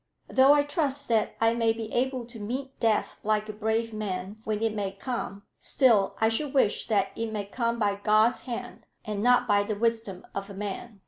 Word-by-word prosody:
Though 265 Hz, +1 st, +6 dB
I 290 Hz, -1 st, +4 dB
trust 290 Hz, -2 st, -1 dB
that 225 Hz, -2 st, +1 dB
I 225 Hz, 0 st, +3 dB
may 230 Hz, -1 st, +2 dB
be 225 Hz, -1 st, -6 dB
able 255 Hz, 0 st, 0 dB
to 235 Hz, -1 st, -9 dB
meet 260 Hz, +6 st, -5 dB
death 225 Hz, -2 st, +1 dB
like 215 Hz, 0 st, 0 dB
a 215 Hz, -, -5 dB
brave 220 Hz, +2 st, -1 dB
man 200 Hz, -1 st, -4 dB
when 215 Hz, 0 st, -1 dB
it 225 Hz, -1 st, +1 dB
may 200 Hz, -2 st, -3 dB
come, 200 Hz, -2 st, -5 dB, 0.2 s
still 225 Hz, -8 st, +3 dB
I 220 Hz, -, +4 dB
should 275 Hz, +5 st, -1 dB
wish 215 Hz, -6 st, +2 dB
that 200 Hz, -3 st, +1 dB
it 225 Hz, -1 st, -3 dB
might 205 Hz, -2 st, -4 dB
come 235 Hz, -1 st, -1 dB
by 205 Hz, -3 st, +1 dB
God's 215 Hz, +3 st, +3 dB
hand, 245 Hz, 0 st, -6 dB, 0.2 s
and 210 Hz, -1 st, -3 dB
not 245 Hz, +1 st, +4 dB
by 205 Hz, -2 st, +4 dB
the 205 Hz, +1 st, -2 dB
wisdom 225 Hz, -4 st, -1 dB
of 200 Hz, 0 st, -5 dB
a 200 Hz, -, -9 dB
man. 205 Hz, +2 st, -6 dB
225 Hz, 205 wpm, -27 LUFS, 205-240 Hz, 0.2 s, Though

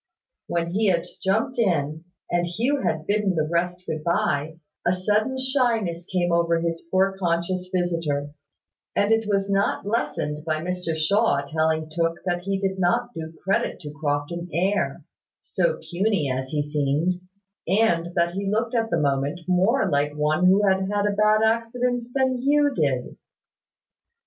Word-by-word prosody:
When 170 Hz, 0 st, -1 dB
he 210 Hz, +4 st, +1 dB
had 170 Hz, -3 st, +2 dB, 0.2 s
jumped 220 Hz, +7 st, 0 dB
in, 160 Hz, -6 st, 0 dB, 0.3 s
and 175 Hz, 0 st, +1 dB
Hugh 245 Hz, +11 st, 0 dB
had 155 Hz, -8 st, -1 dB
bidden 205 Hz, -2 st, +1 dB
the 155 Hz, -1 st, 0 dB
rest 175 Hz, +2 st, -1 dB
good 155 Hz, -3 st, -4 dB
bye, 160 Hz, -2 st, 0 dB, 0.3 s
a 175 Hz, -, +2 dB
sudden 210 Hz, +7 st, 0 dB
shyness 235 Hz, -10 st, 0 dB
came 175 Hz, -2 st, 0 dB
over 170 Hz, 0 st, +2 dB
his 165 Hz, 0 st, -3 dB
poor 190 Hz, +1 st, +2 dB
conscious 180 Hz, +1 st, -1 dB
visitor: 165 Hz, -5 st, -1 dB, 0.6 s
and 205 Hz, +2 st, +2 dB
it 225 Hz, -1 st, +2 dB
was 200 Hz, -1 st, +1 dB
not 195 Hz, 0 st, +1 dB
lessened 150 Hz, -7 st, -2 dB
by 155 Hz, -1 st, -1 dB
Mr 180 Hz, -1 st, -3 dB
Shaw 160 Hz, -3 st, +2 dB
telling 155 Hz, +1 st, 0 dB
Tooke 165 Hz, +1 st, 0 dB
that 175 Hz, -1 st, 0 dB
he 195 Hz, +1 st, -1 dB
did 190 Hz, -1 st, -2 dB
not 235 Hz, +7 st, +1 dB
do 160 Hz, -1 st, -6 dB
credit 195 Hz, -, 0 dB
to 150 Hz, -3 st, -7 dB
Crofton 150 Hz, +4 st, -3 dB
air, 190 Hz, +6 st, 0 dB, 0.4 s
so -, -, 0 dB
puny 180 Hz, -6 st, 0 dB
as 130 Hz, +1 st, -2 dB
he 145 Hz, +2 st, -1 dB
seemed: 150 Hz, +5 st, 0 dB, 0.5 s
and 175 Hz, -3 st, +2 dB
that 170 Hz, 0 st, +2 dB
he 195 Hz, +2 st, -3 dB
looked 225 Hz, +3 st, 0 dB
at 225 Hz, -2 st, +1 dB
that -, -, +1 dB
moment 140 Hz, +4 st, 0 dB
more 195 Hz, +6 st, +3 dB
like 145 Hz, -2 st, +1 dB
one 155 Hz, +4 st, +3 dB
that 190 Hz, 0 st, +4 dB
had 190 Hz, +1 st, -2 dB
had 205 Hz, 0 st, +1 dB
a 205 Hz, -1 st, 0 dB
bad 215 Hz, +1 st, +4 dB
accident 235 Hz, +2 st, 0 dB
than 260 Hz, -2 st, +1 dB
Hugh 290 Hz, +1 st, +3 dB
did. 135 Hz, -, -1 dB
180 Hz, 160 wpm, -24 LUFS, 160-210 Hz, 0.6 s, that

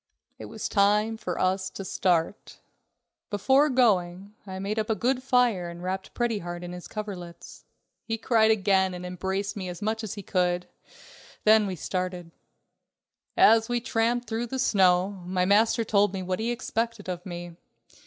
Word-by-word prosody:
It -, -, -7 dB
was -, -, -5 dB
time 210 Hz, +2 st, +2 dB
for 180 Hz, -5 st, -5 dB
us 185 Hz, 0 st, 0 dB
to 195 Hz, -, -8 dB
start. 175 Hz, 0 st, -1 dB, 0.7 s
Before 265 Hz, +8 st, +3 dB
going, 200 Hz, -6 st, +1 dB
I 190 Hz, 0 st, -6 dB
made 200 Hz, +3 st, -2 dB
up 215 Hz, -, -2 dB
a 220 Hz, -, +2 dB
good 255 Hz, +3 st, 0 dB
fire 245 Hz, -9 st, +2 dB
and 170 Hz, +1 st, -9 dB
wrapped 190 Hz, +1 st, -4 dB
Pretty 235 Hz, -3 st, 0 dB
Heart 175 Hz, 0 st, -6 dB
up -, -, -5 dB
in 175 Hz, -, -7 dB
his 180 Hz, 0 st, -8 dB
coverlets. 190 Hz, -5 st, -8 dB, 0.4 s
He 225 Hz, -1 st, -3 dB
cried 220 Hz, -1 st, +3 dB
again 190 Hz, -3 st, +2 dB
and 180 Hz, 0 st, -7 dB
embraced 190 Hz, +3 st, -3 dB
me 190 Hz, -3 st, -5 dB
as 175 Hz, -1 st, -7 dB
much 220 Hz, +2 st, -2 dB
as 210 Hz, -, -5 dB
he 200 Hz, -, -7 dB
could, 180 Hz, -1 st, 0 dB, 0.8 s
then 215 Hz, -1 st, +5 dB
we 190 Hz, -, -3 dB
started. 180 Hz, -1 st, -4 dB, 1.1 s
As 225 Hz, +1 st, +5 dB
we 240 Hz, 0 st, +1 dB
tramped 235 Hz, 0 st, 0 dB
through 225 Hz, +2 st, -2 dB
the 265 Hz, -, -4 dB
snow, 190 Hz, -4 st, +2 dB
my 180 Hz, 0 st, 0 dB
master 220 Hz, +4 st, +3 dB
told 205 Hz, -2 st, +2 dB
me 190 Hz, -, -3 dB
what 185 Hz, +1 st, -2 dB
he 225 Hz, +2 st, -1 dB
expected 230 Hz, -2 st, -3 dB
of 175 Hz, -1 st, -4 dB
me. 175 Hz, -2 st, -8 dB
200 Hz, 175 wpm, -26 LUFS, 180-225 Hz, 1.1 s, then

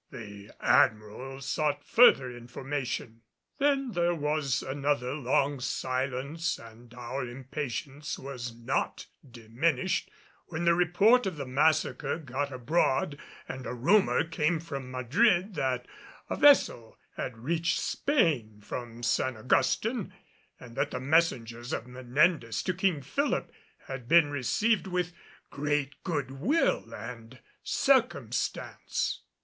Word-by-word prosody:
The 100 Hz, -5 st, -10 dB
Admiral 110 Hz, +5 st, +2 dB
sought 145 Hz, +2 st, -1 dB
further 130 Hz, -, +5 dB
information. 120 Hz, -1 st, -5 dB, 0.4 s
Then 275 Hz, -2 st, +2 dB
there 175 Hz, -2 st, +1 dB
was 150 Hz, -3 st, 0 dB
another 135 Hz, -2 st, -1 dB
long 140 Hz, 0 st, +1 dB
silence 130 Hz, +5 st, -2 dB
and 115 Hz, +1 st, -14 dB
our 125 Hz, +2 st, -4 dB
impatience 135 Hz, +3 st, -5 dB
was 125 Hz, -3 st, -6 dB
not 115 Hz, 0 st, -2 dB, 0.2 s
diminished 125 Hz, -, -1 dB, 0.4 s
when 170 Hz, 0 st, -3 dB
the 170 Hz, -, +6 dB
report 195 Hz, +7 st, +4 dB
of 180 Hz, -5 st, -4 dB
the 140 Hz, -, -4 dB
massacre 150 Hz, +6 st, +1 dB
got 145 Hz, -2 st, -3 dB
abroad 140 Hz, +2 st, 0 dB, 0.3 s
and 130 Hz, -2 st, -6 dB
a 125 Hz, -, -4 dB
rumor 195 Hz, -, +3 dB
came 165 Hz, 0 st, 0 dB
from 140 Hz, -5 st, -6 dB
Madrid 175 Hz, -, +2 dB
that 130 Hz, -5 st, -1 dB, 0.4 s
a -, -, +1 dB
vessel 275 Hz, -, +4 dB, 0.2 s
had 125 Hz, -, -4 dB
reached 165 Hz, +7 st, 0 dB
Spain 145 Hz, -, +1 dB
from 120 Hz, +2 st, -7 dB
San 120 Hz, +1 st, +1 dB
Augustin 185 Hz, -, +1 dB, 0.5 s
and 120 Hz, -1 st, -12 dB
that -, -, 0 dB
the 125 Hz, -, -4 dB
messengers 125 Hz, -5 st, +1 dB
of 115 Hz, -, -3 dB
Menendez 125 Hz, +1 st, +1 dB
to 185 Hz, -, 0 dB
King 180 Hz, -5 st, 0 dB
Philip 280 Hz, -, -1 dB, 0.3 s
had 135 Hz, -3 st, -7 dB
been 165 Hz, -1 st, +5 dB
received 195 Hz, -, +1 dB
with 180 Hz, -1 st, -1 dB, 0.4 s
great 145 Hz, -1 st, -2 dB
good 145 Hz, -7 st, -2 dB
will 140 Hz, -, +1 dB
and 115 Hz, +2 st, -8 dB, 0.2 s
circumstance. -, -, 0 dB
135 Hz, 120 wpm, -29 LUFS, 125-165 Hz, 0.5 s, the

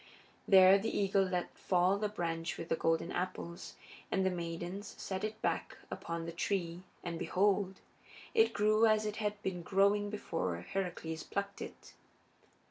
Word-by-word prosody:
There 190 Hz, 0 st, +8 dB
the 225 Hz, +3 st, -1 dB
eagle 195 Hz, 0 st, +3 dB
let 180 Hz, -1 st, -2 dB
fall 185 Hz, +2 st, +2 dB
the 210 Hz, 0 st, 0 dB
branch 165 Hz, -4 st, -3 dB
with 165 Hz, -, -6 dB
the -, -, +3 dB
golden 165 Hz, +1 st, +1 dB
apples, 180 Hz, -1 st, -4 dB, 0.4 s
and 190 Hz, -1 st, +2 dB
the 190 Hz, -, +3 dB
maidens 175 Hz, +3 st, -5 dB
set 190 Hz, 0 st, -4 dB
it 215 Hz, 0 st, -3 dB
back -, -, -1 dB
upon 170 Hz, 0 st, -4 dB
the 170 Hz, -, -4 dB
tree, 170 Hz, 0 st, -2 dB, 0.2 s
and 170 Hz, -2 st, -4 dB
behold! 195 Hz, 0 st, +2 dB, 0.6 s
it 450 Hz, -1 st, +5 dB
grew 215 Hz, +2 st, +4 dB
as 215 Hz, 0 st, +3 dB
it 210 Hz, 0 st, -3 dB
had 210 Hz, -1 st, -2 dB
been 180 Hz, -2 st, -2 dB
growing 200 Hz, +3 st, +3 dB
before 165 Hz, -, -2 dB
Heracles 160 Hz, -, -3 dB
plucked 200 Hz, 0 st, -4 dB
it. -, -, -9 dB
190 Hz, 155 wpm, -34 LUFS, 170-205 Hz, 0.6 s, There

